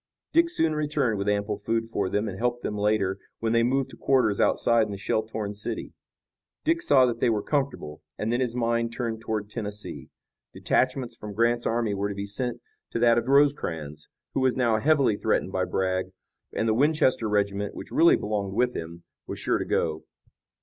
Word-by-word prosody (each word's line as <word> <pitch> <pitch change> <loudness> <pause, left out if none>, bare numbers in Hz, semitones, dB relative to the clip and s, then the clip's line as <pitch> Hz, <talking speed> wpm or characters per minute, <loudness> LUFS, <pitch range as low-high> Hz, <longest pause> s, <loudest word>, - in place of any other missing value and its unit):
Dick 335 0 +4
soon 165 - +1
returned 145 -8 0
with 100 +1 0
ample 105 0 -1
food 115 +2 -1
for 100 -4 -2
them 105 +3 0
and 95 - -4
helped 120 0 -1
them 105 - -2
later, 100 -2 +1 0.2
when 115 0 -1
they 115 - +4
moved 130 +3 +1
to - - -11
quarters 130 -7 +2
outside 115 -2 +3
in - - -7
the 100 - -5
shell 110 +2 0
torn 110 -2 -5
city. 105 +1 -5 0.7
Dick 330 +2 +1
saw 130 - +5
that 120 -2 -2
they 125 - +3
were 105 -3 0
comfortable, 135 - -2 0.2
and 110 +2 -1
then 120 - +1
his 125 -2 -1
mind 115 -1 0
turned 115 -2 -3
toward 110 -2 -3
Tennessee. 105 0 -5 0.5
Detachments 130 -1 0
from 105 -1 -8
Grant's 120 +2 +2
army 115 -2 0
were 100 +1 -1
to 100 - -5
be 100 0 -4
sent 120 +4 -3 0.3
to - - -3
that 115 0 +4
of 115 - -6
Rosecrans, 85 - +1 0.2
who - - 0
was 130 -1 +2
now 115 -4 +2
heavily 140 -5 +3
threatened 105 -3 0
by 95 -1 0
Bragg, 95 0 -1 0.4
and 115 - -1
the 110 - +3
Winchester 130 -3 +2
regiment, 100 -1 0
which - - -9
really 170 +1 +6
belonged 100 -2 -3
with 125 +2 +1
him, 85 +1 -7 0.2
was - - -5
sure - - 0
to - - -2
go. 80 -1 -1
115 Hz, 200 wpm, -26 LUFS, 100-125 Hz, 0.7 s, really